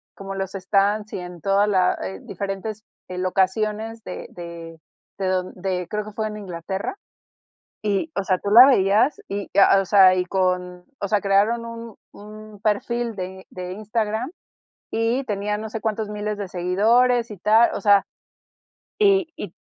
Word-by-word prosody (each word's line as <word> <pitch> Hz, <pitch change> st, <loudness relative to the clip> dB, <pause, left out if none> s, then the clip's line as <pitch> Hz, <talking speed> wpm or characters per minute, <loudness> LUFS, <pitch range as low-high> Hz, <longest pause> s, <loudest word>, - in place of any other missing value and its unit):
como 195 Hz, 0 st, -7 dB
en 195 Hz, -, -5 dB
los 190 Hz, -1 st, -3 dB
stands 200 Hz, +2 st, 0 dB
y -, -, -3 dB
en 180 Hz, -1 st, -9 dB
toda 195 Hz, +3 st, +3 dB
la 185 Hz, -3 st, +2 dB
eh, 95 Hz, 0 st, -5 dB
diferentes 200 Hz, +2 st, -5 dB, 0.2 s
eh, 180 Hz, -, -7 dB
locaciones 210 Hz, +4 st, -1 dB
de -, -, -7 dB
de 170 Hz, -1 st, -9 dB, 0.4 s
de 195 Hz, -1 st, -2 dB
don 185 Hz, -1 st, -1 dB
de 180 Hz, -1 st, -3 dB
creo 210 Hz, 0 st, -3 dB
que 215 Hz, -, -9 dB
fue 215 Hz, +1 st, -3 dB
en 210 Hz, -, -6 dB
Inglaterra, 190 Hz, -, -5 dB, 0.9 s
y, 210 Hz, +9 st, -1 dB
o 200 Hz, -, -1 dB
sea, 185 Hz, -1 st, +1 dB
tú 200 Hz, -, -3 dB
la 235 Hz, +5 st, +10 dB
veías 220 Hz, +1 st, +3 dB
y, 200 Hz, 0 st, -4 dB
ah, 195 Hz, -, +6 dB
o 195 Hz, -, -1 dB
sea, 190 Hz, -1 st, +6 dB
y 180 Hz, 0 st, 0 dB
con, 180 Hz, -1 st, -1 dB
o 200 Hz, -, -2 dB
sea, 210 Hz, 0 st, +1 dB
crearon 205 Hz, +4 st, +2 dB
un 230 Hz, -2 st, -8 dB, 0.2 s
un 215 Hz, 0 st, -12 dB
perfil 230 Hz, +2 st, -1 dB
de 190 Hz, 0 st, -7 dB
de 180 Hz, 0 st, -6 dB
Instagram 215 Hz, -, -2 dB, 0.6 s
y 230 Hz, +4 st, 0 dB
tenía 210 Hz, -2 st, -2 dB
no 220 Hz, +1 st, -6 dB
sé 220 Hz, 0 st, -5 dB
cuántos 220 Hz, -1 st, -2 dB
miles 210 Hz, 0 st, -3 dB
de 200 Hz, -2 st, -5 dB
seguidores 225 Hz, +7 st, +2 dB
y 205 Hz, -, -8 dB
tal, 220 Hz, +5 st, +4 dB
o -, -, -3 dB
sea, 205 Hz, -2 st, +5 dB, 0.9 s
y 390 Hz, -4 st, +4 dB
y 190 Hz, -4 st, -7 dB
205 Hz, 175 wpm, -23 LUFS, 185-220 Hz, 0.9 s, la